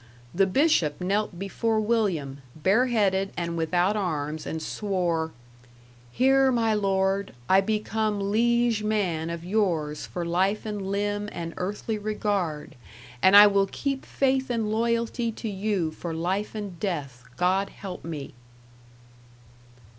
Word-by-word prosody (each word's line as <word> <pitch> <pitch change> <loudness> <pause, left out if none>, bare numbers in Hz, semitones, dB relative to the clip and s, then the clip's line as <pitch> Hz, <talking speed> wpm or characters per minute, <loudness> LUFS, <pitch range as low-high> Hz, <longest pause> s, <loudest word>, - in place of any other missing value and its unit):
The 195 +2 +3
bishop 190 - +2
knelt 195 0 -1
before 215 +4 -1
William, 190 -12 0
bareheaded 195 - +2
and 170 -1 -2
without 175 +5 +1
arms, 155 -6 -2
and 160 - -3
swore: 175 -3 -1 0.8
"Hear 265 - +4
my 230 -3 +2
lord, 195 -1 0
I 190 +1 +5
become 215 -1 -1
liege 235 0 +2
man 190 -7 -1
of 170 0 -5
yours 170 -7 0
for 175 -1 -4
life 190 +6 0
and 205 -3 -4
limb 205 +1 -1
and 165 -1 -5
earthly 210 +3 -3
regard, 205 -7 -2 0.5
and 190 +2 +7
I 205 - +11
will 200 -1 +3
keep 275 +6 -3
faith 265 -1 0
and 225 -3 -1
loyalty 230 +1 0
to 225 - -6
you 195 -5 -1
for 165 +1 -6
life 190 +7 -2
and 200 -5 -6
death, 140 -11 -4
God 190 +2 +1
help 195 -2 -8
me." 155 -4 -6
195 Hz, 130 wpm, -26 LUFS, 170-215 Hz, 0.8 s, I